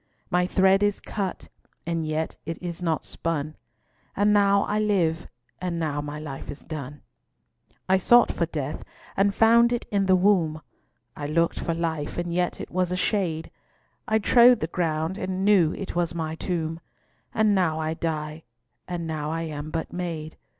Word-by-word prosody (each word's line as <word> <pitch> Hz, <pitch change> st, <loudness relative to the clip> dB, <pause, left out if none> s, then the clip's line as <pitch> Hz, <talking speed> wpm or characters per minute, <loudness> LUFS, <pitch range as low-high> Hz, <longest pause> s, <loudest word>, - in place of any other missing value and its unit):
My 180 Hz, 0 st, +2 dB
thread 190 Hz, +1 st, +4 dB
is 205 Hz, -1 st, +1 dB
cut, 195 Hz, -4 st, -4 dB, 0.4 s
and 165 Hz, -1 st, -1 dB
yet 155 Hz, +1 st, -2 dB
it 165 Hz, +1 st, -5 dB
is 175 Hz, -1 st, -5 dB
not 165 Hz, -3 st, -1 dB
spun; 155 Hz, -2 st, -3 dB, 0.6 s
And 205 Hz, +1 st, +3 dB
now 200 Hz, -1 st, +4 dB
I 210 Hz, -, -1 dB
live, 180 Hz, -7 st, +1 dB, 0.3 s
and 180 Hz, -2 st, -2 dB
now 150 Hz, -3 st, -1 dB
my 145 Hz, +1 st, -6 dB
life 140 Hz, -3 st, -7 dB
is 145 Hz, -, -7 dB
done. 145 Hz, -2 st, -7 dB, 0.8 s
I 190 Hz, 0 st, +4 dB
sought 240 Hz, +5 st, +5 dB
for 170 Hz, -, -1 dB
death, 150 Hz, -3 st, -4 dB, 0.3 s
and 200 Hz, +1 st, +2 dB
found 235 Hz, +1 st, +5 dB
it 240 Hz, -, -1 dB
in 200 Hz, -2 st, +1 dB
the 185 Hz, -, +6 dB
wombe; 180 Hz, -5 st, +3 dB, 0.6 s
I 145 Hz, -, -4 dB
lookt 165 Hz, +2 st, +1 dB
for 165 Hz, -, -2 dB
life, 160 Hz, -3 st, -2 dB
and 175 Hz, -1 st, -2 dB
yet 180 Hz, 0 st, 0 dB
it -, -, -7 dB
was 180 Hz, 0 st, 0 dB
a -, -, 0 dB
shade; 180 Hz, -5 st, -1 dB, 0.6 s
I 220 Hz, -, +3 dB
trode 240 Hz, +2 st, +6 dB
the -, -, -1 dB
ground, 165 Hz, +1 st, -1 dB
and 185 Hz, +1 st, -2 dB
knew 190 Hz, -6 st, +5 dB
it 195 Hz, -, -6 dB
was 170 Hz, -1 st, 0 dB
my 160 Hz, -1 st, -2 dB
tombe, 165 Hz, -1 st, -3 dB, 0.5 s
And 215 Hz, -1 st, +3 dB
now 170 Hz, -5 st, +1 dB
I 160 Hz, 0 st, -1 dB
dye, 155 Hz, -1 st, -3 dB, 0.5 s
and 175 Hz, -2 st, -4 dB
now 155 Hz, -2 st, -3 dB
I 165 Hz, +1 st, -2 dB
am 150 Hz, -1 st, -5 dB
but 160 Hz, +1 st, -4 dB
made. 165 Hz, -3 st, -4 dB
170 Hz, 175 wpm, -25 LUFS, 155-190 Hz, 0.8 s, the